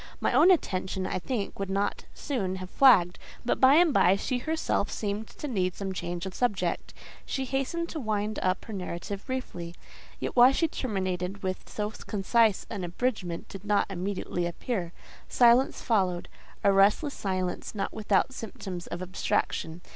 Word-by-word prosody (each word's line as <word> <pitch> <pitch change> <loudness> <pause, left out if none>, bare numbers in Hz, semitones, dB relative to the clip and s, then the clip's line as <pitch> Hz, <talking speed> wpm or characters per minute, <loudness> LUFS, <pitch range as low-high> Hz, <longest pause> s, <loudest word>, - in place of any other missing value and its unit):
My - - +1
own 360 - +6
attention 190 - +1
I - - -2
think 210 0 -3
would 195 -1 -3
not 200 +1 -1
soon 200 -10 -2
have 185 0 -7
flagged, 190 -10 +5 0.3
but 240 - 0
by 265 +2 +8
and 335 -2 +5
by, 180 +2 +5
she 245 +5 -2
herself 315 -7 -1
seemed 210 +1 -3
to 295 - -7
need 185 -8 0
some 195 -1 -4
change 175 -1 -4
of 190 - -5
subject; 195 -8 -1 0.3
she 265 - -3
hastened 275 +6 -1
to 320 - -4
wind 215 -3 -1
up 185 0 0
her 220 - -7
narrative 195 +1 -5
briefly. 175 -10 -5 0.4
Yet - - -4
why 250 +2 +8
she 330 - +2
terminated 190 - -3
with 185 0 -4
so 210 0 -3
concise 215 +1 +1
an 195 - -5
abridgment 175 -2 -2
did 195 -1 -9
not 205 -1 +1
immediately 185 -2 -2
appear; 175 0 -3 0.4
silence 245 +2 +4
followed—a 195 -2 0
restless 205 +9 +4
silence, 185 0 -3
not 195 - -2
without 215 +4 +1
symptoms 190 -6 -7
of 175 +1 -5
abstraction. 175 -2 -2
200 Hz, 160 wpm, -28 LUFS, 185-245 Hz, 0.4 s, by